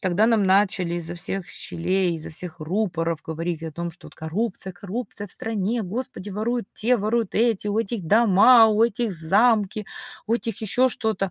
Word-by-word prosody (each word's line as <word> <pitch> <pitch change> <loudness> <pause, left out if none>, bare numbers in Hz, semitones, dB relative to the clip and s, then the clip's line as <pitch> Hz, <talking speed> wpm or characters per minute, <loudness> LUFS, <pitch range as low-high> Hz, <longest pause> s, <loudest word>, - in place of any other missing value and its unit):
когда 190 +3 +2
нам 225 -4 +3
начали 190 -2 +2
изо 175 0 -4
всех 180 +1 -3
щелей, 180 +1 -1
изо 160 - -7
всех 160 0 -7
рупоров 165 -2 -1
говорить 165 0 -4
о 160 - -6
том, 170 +2 -4
что 165 - -16
вот: - - -15
"Коррупция 190 +3 -3
коррупция 205 +2 -6
в - - -7
стране. 225 +1 -1
Господи, 210 0 -5
воруют 220 +2 -2
те, 245 +3 +2
воруют 220 0 -1
эти, 225 -2 +1
у 210 +2 0
этих 205 -5 -2
дома, 225 +3 +6
у 215 +1 +2
этих 235 0 -1
замки, 205 +5 +2 0.4
у 230 - +1
этих 230 -3 -3
ещё 250 +5 +2
что-то". 220 -5 -2
200 Hz, 175 wpm, -23 LUFS, 175-225 Hz, 0.4 s, дома